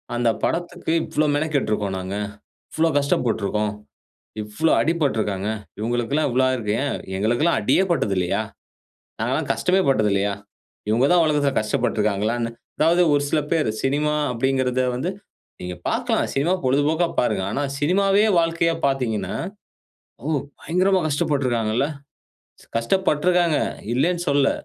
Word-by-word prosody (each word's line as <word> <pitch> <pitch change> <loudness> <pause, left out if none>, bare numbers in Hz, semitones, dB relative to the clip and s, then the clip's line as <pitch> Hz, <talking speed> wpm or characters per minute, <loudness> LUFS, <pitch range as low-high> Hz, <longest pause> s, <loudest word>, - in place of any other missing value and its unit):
அந்த 120 -1 +2
படத்துக்கு 175 -1 -2
"இவ்ளோ 155 - 0
மெனக்கெட்டுருக்கோம் 130 -10 0
நாங்க. 95 +1 -5 0.6
இவ்ளோ 165 +1 +2
கஷ்டப்பட்டுருக்கோம். 110 -6 0 0.7
இவ்ளோ 105 +10 0
அடிபட்டுருக்காங்க. 110 - 0 0.3
இவங்களுக்கெல்லாம் 120 +7 0
இவ்ளோ 130 +2 +2
ஆயிருக்கு." 115 -5 -1
ஏன் 145 - -1 0.3
எங்களுக்கெல்லாம் 120 - +2
அடியே 130 - +3
பட்டதுல்லையா? 100 - 0 0.8
நாங்க - - 0
எல்லா - - 0
கஷ்டமே 185 +1 +2
பட்டதுல்லையா? 105 -5 +2 0.5
இவங்க 115 +5 +3
தான் 175 -1 +5
உலகத்துல 145 -2 +2
கஷ்டப்பட்டுருக்கிறாங்களான்னு. 110 +2 0 0.3
அதாவது 170 +3 +4
ஒரு 145 0 +3
சில 155 - +2
பேர், 155 -9 +2
சினிமா 145 +3 +1 0.2
அப்படிங்கிறத 130 +1 +1
வந்து 150 +9 -2 0.5
நீங்க 90 0 -5
பார்க்கலாம். - - 0
சினிமா, 145 +6 +1
பொழுதுபோக்கா 145 +6 +2
பாருங்க. 120 -5 0
ஆனா, 145 - -1 0.2
சினிமாவே 195 +7 +3
வாழ்க்கைய 165 0 +1
பார்த்தீங்கன்னா, 110 -8 -1 0.9
"ஓ! - - -7 0.3
பயங்கரமா 185 +4 +2
கஷ்டப்பட்டுருக்காங்கல்ல." 130 -5 0 0.9
கஷ்டப்பட்டுருக்காங்க, 175 +4 +2 0.4
இல்லன்னு 175 +7 +1
சொல்லல. 140 -1 +3
135 Hz, 110 wpm, -22 LUFS, 110-160 Hz, 0.9 s, தான்